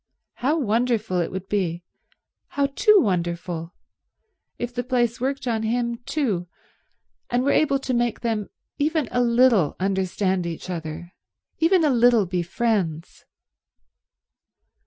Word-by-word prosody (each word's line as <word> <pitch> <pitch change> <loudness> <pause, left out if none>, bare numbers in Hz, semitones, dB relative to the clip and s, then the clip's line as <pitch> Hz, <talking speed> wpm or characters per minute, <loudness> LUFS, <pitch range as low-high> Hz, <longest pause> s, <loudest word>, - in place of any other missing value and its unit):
How 290 +6 +1
wonderful 225 - 0
it 170 - -1
would 190 0 -6
be, 180 -4 -1 0.6
how 280 - 0
too 425 +8 +5
wonderful, 170 - -2 0.8
if 240 0 -4
the 245 0 -2
place 240 -2 0
worked 270 +1 -2
on 225 -2 0
him 235 +1 -1
too 215 - -1 0.8
and 245 +1 +1
were 280 - +2
able 275 -3 +3
to 270 -1 -3
make 240 -2 0
them 220 -4 -2 0.3
even 305 -2 +1
a 245 - +1
little 235 - +3
understand 190 -1 0
each 170 +2 -6
other, 170 +1 -6 0.5
even 335 +2 +4
a 300 - +3
little 240 -3 +4
be 180 0 -1
friends. 175 -4 -2
225 Hz, 130 wpm, -23 LUFS, 180-250 Hz, 0.8 s, too